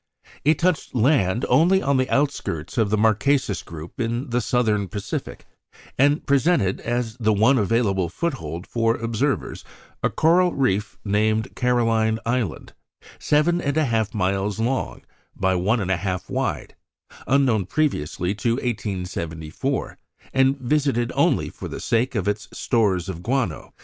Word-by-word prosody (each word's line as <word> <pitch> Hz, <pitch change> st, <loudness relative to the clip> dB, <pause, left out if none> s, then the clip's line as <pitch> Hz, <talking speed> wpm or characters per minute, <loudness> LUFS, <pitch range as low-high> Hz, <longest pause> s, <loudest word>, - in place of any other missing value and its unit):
It 150 Hz, +1 st, +3 dB
touched 175 Hz, -6 st, 0 dB
land 120 Hz, -3 st, +2 dB
only 180 Hz, +4 st, +4 dB
on 140 Hz, -7 st, +1 dB
the 130 Hz, 0 st, 0 dB
outskirts 135 Hz, -, -1 dB
of 110 Hz, -3 st, +2 dB
the 110 Hz, -, +1 dB
Marquesas 110 Hz, +1 st, +2 dB
group 85 Hz, +5 st, -10 dB
in 120 Hz, +3 st, -2 dB
the 125 Hz, +1 st, +1 dB
Southern 110 Hz, -6 st, +1 dB
Pacific, 100 Hz, +1 st, -5 dB, 0.5 s
and 145 Hz, +3 st, +2 dB
presented, 140 Hz, -, +2 dB
as 120 Hz, -2 st, -2 dB
the 110 Hz, -3 st, +1 dB
one 110 Hz, +6 st, +4 dB
available 100 Hz, -4 st, +1 dB
foothold 90 Hz, -, -4 dB
for 115 Hz, -1 st, +1 dB
observers, 115 Hz, +5 st, -2 dB, 0.4 s
a -, -, +2 dB
coral 175 Hz, +2 st, +3 dB
reef 110 Hz, -6 st, 0 dB
named 110 Hz, +2 st, 0 dB
Caroline 115 Hz, -3 st, +2 dB
Island, 115 Hz, -7 st, -2 dB, 0.5 s
seven 165 Hz, +4 st, +2 dB
and 145 Hz, 0 st, -1 dB
a 155 Hz, -, +3 dB
half 110 Hz, -4 st, 0 dB
miles 100 Hz, +2 st, 0 dB
long 125 Hz, +4 st, -2 dB, 0.3 s
by 95 Hz, 0 st, +1 dB
one 100 Hz, +7 st, +1 dB
and 95 Hz, -2 st, -1 dB
a 95 Hz, -, +2 dB
half 90 Hz, -1 st, -4 dB
wide, -, -, -2 dB, 0.5 s
unknown 130 Hz, -8 st, +2 dB
previously 95 Hz, -, -1 dB
to 115 Hz, +3 st, 0 dB
1874, 95 Hz, -, -3 dB, 0.3 s
and 135 Hz, +1 st, +3 dB
visited 130 Hz, -2 st, 0 dB
only -, -, +2 dB
for -, -, -8 dB
the -, -, -6 dB
sake 120 Hz, +3 st, 0 dB
of 100 Hz, -2 st, -1 dB
its 105 Hz, -1 st, -2 dB
stores 100 Hz, -7 st, 0 dB
of 90 Hz, -3 st, -5 dB
guano. 120 Hz, -, -2 dB
115 Hz, 145 wpm, -23 LUFS, 100-135 Hz, 0.5 s, only